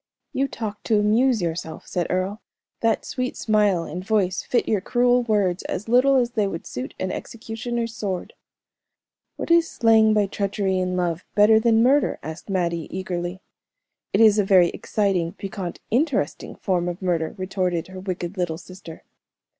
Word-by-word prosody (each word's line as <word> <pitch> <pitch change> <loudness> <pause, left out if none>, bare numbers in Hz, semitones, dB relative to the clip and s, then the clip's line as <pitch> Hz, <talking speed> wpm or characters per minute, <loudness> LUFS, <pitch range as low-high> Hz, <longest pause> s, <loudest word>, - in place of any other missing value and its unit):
"You 275 +1 +1
talk 215 -5 -6
to 220 -3 +3
amuse 220 +1 +3
yourself," 160 -1 -4
said 175 -2 -2
Earle, 185 +4 -1 0.4
"that 225 -1 +1
sweet 255 0 -3
smile 210 -5 +2
and 175 +3 -6
voice 195 -3 +1
fit 245 - 0
your 210 -4 +1
cruel 245 +3 +3
words 205 -6 +1
as 210 - -4
little 255 +4 +4
as 245 -2 +2
they 215 -4 +1
would 170 -4 -5
suit 125 +1 -6
an 185 - -2
executioner's 230 0 -4
sword." 190 -5 -4 1.0
"What - - -4
is 335 -1 +5
slaying 220 -1 +4
by 210 -1 +3
treachery 195 -1 -1
in 185 0 -1
love 175 -1 -1
better 215 +1 +6
than 225 0 +4
murder?" 275 +4 +3
asked 160 +6 -8
Mattie, 170 -4 -1
eagerly. 180 0 -4 0.7
"It - - +2
is 215 -1 +6
a - - +4
very 185 -3 +5
exciting, 190 -5 -1
piquant, 195 -3 -6
interesting 240 - 0
form 175 -2 -1
of 175 +2 -6
murder," 170 -2 -1
retorted 185 -2 -2
her 185 0 -8
wicked 185 0 -5
little 175 -3 -1
sister. 180 -2 -12
195 Hz, 160 wpm, -23 LUFS, 180-225 Hz, 1.0 s, better